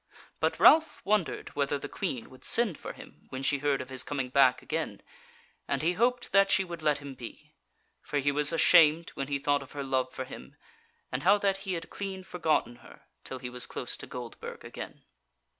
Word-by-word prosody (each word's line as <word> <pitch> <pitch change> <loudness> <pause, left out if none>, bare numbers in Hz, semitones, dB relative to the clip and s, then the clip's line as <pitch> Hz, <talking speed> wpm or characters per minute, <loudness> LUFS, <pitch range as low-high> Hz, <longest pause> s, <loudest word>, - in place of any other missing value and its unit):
But - - 0
Ralph 320 0 +6
wondered 205 -4 0
whether 145 0 -1
the - - -6
Queen 165 - -4
would 130 - -15
send 230 -8 +3
for - - -7
him - - -15
when 130 +1 -5
she 140 0 +2
heard 145 -1 +1
of 130 +1 -9
his 130 -1 -1
coming 135 -3 -3
back 130 -1 +4
again, 160 +1 -3 0.6
and - - -1
he 170 +2 +2
hoped 245 +5 +1
that 195 0 +5
she 195 - +4
would 170 -3 -7
let 150 -2 +2
him 140 -1 -8
be; 130 +5 -11 0.5
for 145 - -3
he 145 0 +2
was 145 +1 +3
ashamed 165 0 +5
when 135 - -4
he 140 0 0
thought 145 +1 +1
of 135 - -12
her 145 -1 -4
love 130 -1 0
for 130 0 -5
him, 130 - -11 0.6
and 125 - -2
how 205 - +5
that 200 -1 +1
he - - +1
had 165 - -5
clean 190 -2 -5
forgotten 160 -9 0
her - - -16 0.2
till 130 - -6
he 125 -1 -6
was 125 0 -3
close 120 - -5
to - - -8
Goldburg 120 -2 -8
again. - - -8
145 Hz, 210 wpm, -29 LUFS, 130-180 Hz, 0.6 s, Ralph